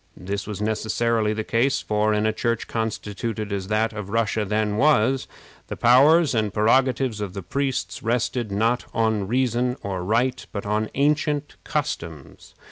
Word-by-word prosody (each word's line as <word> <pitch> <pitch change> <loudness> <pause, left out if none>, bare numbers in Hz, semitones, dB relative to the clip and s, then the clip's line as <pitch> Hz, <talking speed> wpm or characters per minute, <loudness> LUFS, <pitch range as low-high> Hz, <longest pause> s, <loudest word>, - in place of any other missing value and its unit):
This 100 +2 -4
was 105 -1 -4
necessarily 110 0 0
the 110 0 -2
case; 120 +5 +1
for, 105 0 0
in 105 0 +1
a 110 - +1
Church 115 +1 -1
constituted 110 -1 -3
as 95 -1 -3
that 110 +2 0
of 105 -2 -6
Russia 110 0 0
then 105 0 -1
was, 135 -2 +3 0.4
the - - -6
powers 140 +6 +5
and 110 -3 0
prerogatives 125 +2 +2
of 100 -3 -4
the 100 -1 -6
priests 115 -3 -2
rested, 120 -1 -1
not 115 +5 +1
on 110 -3 +1
reason 125 +1 +1
or 95 -3 -3
right, 120 +6 0
but 100 - -5
on 105 +1 -1
ancient 145 +1 0
customs. 80 -4 -5
110 Hz, 155 wpm, -23 LUFS, 105-125 Hz, 0.4 s, powers